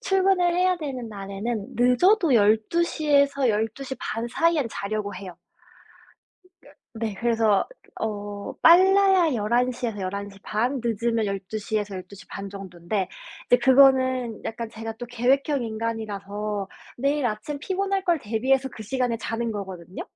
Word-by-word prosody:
출근을 380 -2 +2
해야 365 0 +2
되는 265 -7 -5
날에는 200 +1 -4
늦어도 290 - +4
12:00 230 +10 +2
에서 280 -2 +4
12:30 225 +2 -2
사이엔 315 -2 +1
자려고 205 0 -3
해요. 180 -1 -9 1.6
네. 220 -2 -3
그래서 225 -1 +2 0.3
어 205 -2 -4
빨라야 375 -1 +6
11:00 245 +3 0
에서 220 -3 -4
11:30 200 +6 -3
늦으면 230 0 0
12:00 200 +2 -3
에서 205 -1 -5
12:30 195 +1 -8
정도인데 190 0 -4 0.4
이제 245 - +5
그거는 260 -3 +4
약간 230 0 -4
제가 225 0 -6
또 245 - -6
계획형 260 +4 +1
인간이라서 210 -3 -4 0.3
내일 280 +2 +1
아침 225 +6 -4
피곤할 390 +4 -1
걸 345 -3 +2
대비해서 260 +5 +1
그 220 - -9
시간에 245 +1 -1
자는 225 +1 -3
거거든요. 190 -3 -7
230 Hz, 245 characters per minute, -25 LUFS, 205-275 Hz, 1.6 s, 빨라야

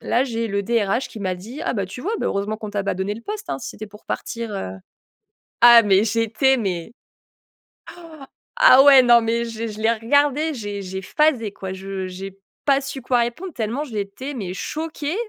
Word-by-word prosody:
là, 250 +3 +1
j'ai 230 -3 -3
le 200 -1 -2
DRH 230 +2 0
qui 220 - -10
m'a 185 -2 -1
dit: 230 - -9
«Ah - - -1
bah, 200 -2 -1
tu 195 +7 -9
vois, 400 - -3
heureusement 205 +2 -1
qu'on 215 -1 -7
t'a 200 -1 -2
pas - - -1
donné 190 +2 -2
le 230 - -9
poste, 425 +1 -6
hein, - - -2
si 245 - -7
c'était 215 - -9
pour 210 +1 -16
partir, 230 -2 -4
heu». 95 - -4 0.9
Ah 235 -1 +9
mais 200 0 +4
j'étais 230 +4 +2
mais 190 -2 -3
oh! - - -73 1.6
Ah 270 - +8
ouais, 275 -2 +8
non, 240 -1 +6
mais 230 +1 0
je 225 -1 -8
l'ai 230 - -2
je 210 0 -9
l'ai 225 +1 +3
regardé, 285 +7 +1
j'ai 205 -4 -5
j'ai 190 +1 -5
phasé 250 -2 +1
quoi. 190 -2 -7
Je 190 0 -5
j'ai 195 +1 -8 0.3
pas 275 -1 +4
su 270 0 -6
quoi 250 0 +1
répondre, 270 +10 -3
tellement 240 +4 -2
j'étais 215 +2 -5
mais 195 -8 -5
choquée, 310 - -4
230 Hz, 205 wpm, -22 LUFS, 200-265 Hz, 1.6 s, Ah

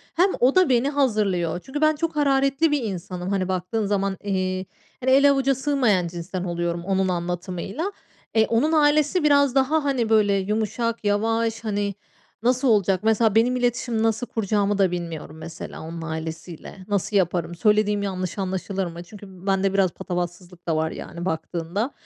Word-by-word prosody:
hem 365 +3 +4
o 255 +3 +4
da 370 -4 +5
beni 255 +2 +3
hazırlıyor. 210 - 0
Çünkü 290 +3 -5
ben 310 0 +4
çok 330 +1 -2
hararetli 275 +1 +2
bir 290 -4 +1
insanım. 185 -3 -5
Hani, 195 -2 0
baktığın 190 +4 -1
zaman, 195 -1 0
eee, 185 -2 -1 0.4
hani, 260 +1 +2
ele 280 +1 +6
avuca 275 0 +2
sığmayan 255 -10 +1
cinsten 175 +2 -5
oluyorum 170 -1 -2
onun 190 -1 +1
anlatımıyla. 180 - -3 0.4
Eee, 220 0 +5
onun 240 +7 +2
ailesi 305 +2 +3
biraz 285 -3 +4
daha, 280 +4 +2
hani, 260 -5 0
böyle, 210 -2 +4
yumuşak, 220 +4 -1
yavaş. 225 +2 0
Hani, 205 -2 -2 0.5
nasıl 255 +3 +2
olacak? 200 -5 +3
Mesela, 220 -1 +3
benim 240 +3 +4
iletişim 240 -2 0
nasıl 225 +2 0
kuracağımı 205 -2 0
da 190 -3 +3
bilmiyorum 165 -3 -5
mesela 165 +2 -8
onun 165 +1 -7
ailesiyle. 165 +3 -7
Nasıl 205 0 -1
yaparım? 175 -2 0
Söylediğim 210 +1 +2
yanlış 185 -1 -3
anlaşılır 190 0 -2
mı? 170 0 -7
Çünkü 205 +3 -12 0.2
bende 195 0 +2
biraz 195 -2 +3
patavatsızlık 175 0 -6
da 165 - +1
var, 160 +1 0
yani, 170 +1 -7
baktığında. 170 - -2
205 Hz, 160 wpm, -23 LUFS, 180-250 Hz, 0.5 s, ele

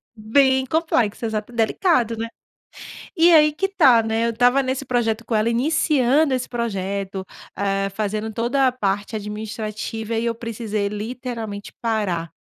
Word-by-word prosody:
Bem 265 +4 +3
complexa. 255 -8 0
Exata 220 +1 -3
delicado, 235 - +1
né. 230 - -3 0.9
E 340 +1 +6
aí 305 -1 +6
que 385 +6 -1
tá, 265 - +5
né. 225 +1 0
Eu - - +1
estava 245 +4 +3
nesse 265 +1 -3
projeto 235 -2 0
com - - -4
ela 215 +2 +2
iniciando 275 +2 +2
esse 255 -1 -1
projeto. 195 -4 -3 0.3
Hã, 195 0 0
fazendo 215 +2 -3
toda 245 +5 +1
a - - +2
parte 205 -2 -2
administrativa, 215 +1 -5
e 230 - -1
eu 230 -1 -1
precisei 220 -3 -3
literalmente 220 -1 -6
parar. 195 -8 -1
230 Hz, 145 wpm, -22 LUFS, 210-255 Hz, 0.9 s, E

